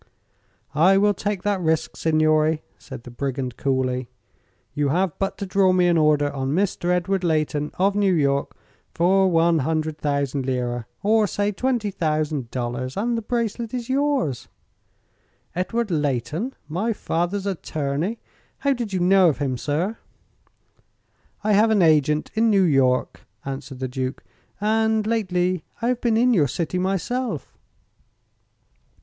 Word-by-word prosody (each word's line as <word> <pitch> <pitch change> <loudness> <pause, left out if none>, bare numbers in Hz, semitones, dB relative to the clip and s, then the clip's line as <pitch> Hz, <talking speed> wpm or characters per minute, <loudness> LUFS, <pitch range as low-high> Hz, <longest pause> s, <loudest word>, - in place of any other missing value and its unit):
"I 180 +6 +5
will 205 +1 +4
take 205 -1 -3
that 205 -2 0
risk, 160 -2 0
signore," 155 0 +2 0.2
said - - -10
the 125 - -10
brigand, 130 -1 -3
coolly. 130 -2 -1 0.6
"You 145 -1 0
have 180 +3 +1
but 195 - -2
to 200 - -4
draw 190 0 +3
me 180 -1 +3
an 175 -1 +3
order 150 -2 +3
on 135 0 -2
Mr. 190 -2 -1
Edward 180 +1 +1
Leighton, 155 -3 0
of 195 +2 +2
New 200 -2 +2
York, 140 -2 0 0.4
for 190 +3 +3
one 165 -1 +3
hundred 155 +1 -1
thousand 140 -2 -1
lira 120 -2 -2 0.2
or 215 +1 +3
say 205 +1 -1
twenty 235 -1 -1
thousand 155 -7 -1
dollars 125 +2 -4
and 235 +4 0
the 230 - -1
bracelet 235 0 -2
is 240 -1 -5
yours." 270 - 0 1.1
"Edward 210 +4 -1
Leighton! 150 - -1
My 195 +9 -1
father's 185 +1 -2
attorney! 160 +1 -2 0.4
How 280 -1 +1
did 240 -5 -4
you 185 - 0
know 185 0 +5
of 140 - -1
him, 130 -1 -1
sir?" 160 - -2 1.4
"I 215 0 +2
have 215 +3 +5
an 210 -4 +4
agent 150 -1 +3
in 225 +1 +2
New 200 -3 +4
York," 135 -6 +2 0.2
answered 135 0 -6
the 130 0 -3
Duke, 130 +1 -4 0.4
"and 220 +1 +1
lately 185 -6 0 0.2
I 235 - 0
have 250 -1 -1
been 230 -2 +2
in 245 +2 +4
your 155 -9 +3
city 165 +6 -2
myself." 195 - -2
175 Hz, 145 wpm, -23 LUFS, 145-205 Hz, 1.4 s, I